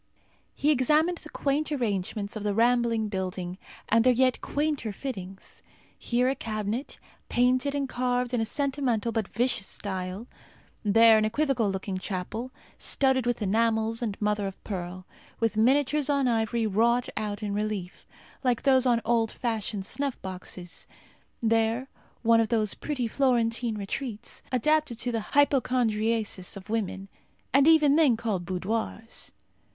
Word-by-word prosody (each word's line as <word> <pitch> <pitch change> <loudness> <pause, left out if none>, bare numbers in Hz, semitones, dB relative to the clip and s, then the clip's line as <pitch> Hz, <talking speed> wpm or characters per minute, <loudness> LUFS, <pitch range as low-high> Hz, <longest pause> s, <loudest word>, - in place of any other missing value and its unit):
He 295 - +2
examined 305 +6 +2
the 310 - -10
quaint 295 +2 -1
arrangements 205 -5 -2
of 215 - -4
the 205 -1 -1
rambling 230 -1 +2
building, 185 -2 -4 0.3
and 225 +1 +4
their 255 - +6
yet 255 +1 +2
quainter 290 -6 -1
fittings. 195 -5 -7 0.3
Here, 245 +1 0
a 265 - +2
cabinet, 220 +1 -4 0.3
painted 255 +3 +2
and 280 -1 -1
carved 250 0 -1
in 240 - +1
a - - +1
sentimental 265 -4 0
but 220 -3 -1
vicious 235 -4 -1
style; 190 +1 -4 0.6
there, 225 +1 +6
an - - +1
equivocal 240 -2 +1
looking 190 0 -3
chapel, 205 +6 -4 0.3
studded 265 -3 +2
with 240 -3 0
enamels 220 +2 +1
and 215 -4 -3
mother 210 -1 0
of 195 - -7
pearl, 185 -2 -5 0.3
with 225 -2 +1
miniatures 275 +5 +2
on 280 -2 +2
ivory 225 0 +1
wrought 235 +4 +2
out 210 0 -3
in 205 -1 -2
relief, 205 -3 -4 0.4
like 250 -2 +1
those 265 -2 +4
on 235 -2 +3
old 225 -1 +2
fashioned 215 -4 -2
snuff 275 +4 -2
boxes; 185 -1 -7 0.6
there, 230 +3 +1 0.3
one 230 0 +5
of 220 - -1
those 215 -3 +1
pretty 265 -6 -3
Florentine 235 -2 +1
retreats, 210 +2 -5
adapted 300 0 +1
to 245 +1 -1
the 225 +1 -4
hypochondriasis 230 -8 +1
of 195 +2 -10
women, 195 -3 -2 0.5
and 275 +2 +5
even 305 -3 +6
then 285 -8 +4
called 210 -6 -2
boudoirs. 220 +4 -3
230 Hz, 145 wpm, -27 LUFS, 210-255 Hz, 0.6 s, their